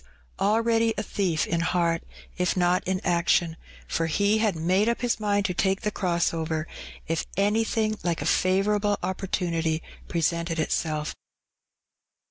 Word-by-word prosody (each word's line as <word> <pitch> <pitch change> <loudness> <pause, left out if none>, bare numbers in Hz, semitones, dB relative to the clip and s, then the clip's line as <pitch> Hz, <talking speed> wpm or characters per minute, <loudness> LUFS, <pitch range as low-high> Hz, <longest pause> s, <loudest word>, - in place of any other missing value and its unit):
already 225 +2 +2
a 210 - -1
thief 180 -7 0
in 170 - -1
heart, 170 -1 +1 0.3
if 180 +1 0
not 180 0 +3
in 190 0 0
iction, 170 -1 +2 0.3
for 165 - 0
he 205 +6 +2
had 215 -4 +1
made 185 +7 +2
up 235 - -1
his 245 -2 0
mind 205 -1 +1
to 180 - 0
take 190 +2 +1
the 210 -2 -1
cross 175 -4 0
over 160 -1 -2 0.4
if 165 0 -1
anything 215 +1 +1
like 170 -2 0
a - - -3
favourable 205 +2 +2
opportunity 175 -3 -1 0.3
presented 170 0 -1
itself. 155 -1 -1
185 Hz, 140 wpm, -26 LUFS, 165-205 Hz, 0.4 s, not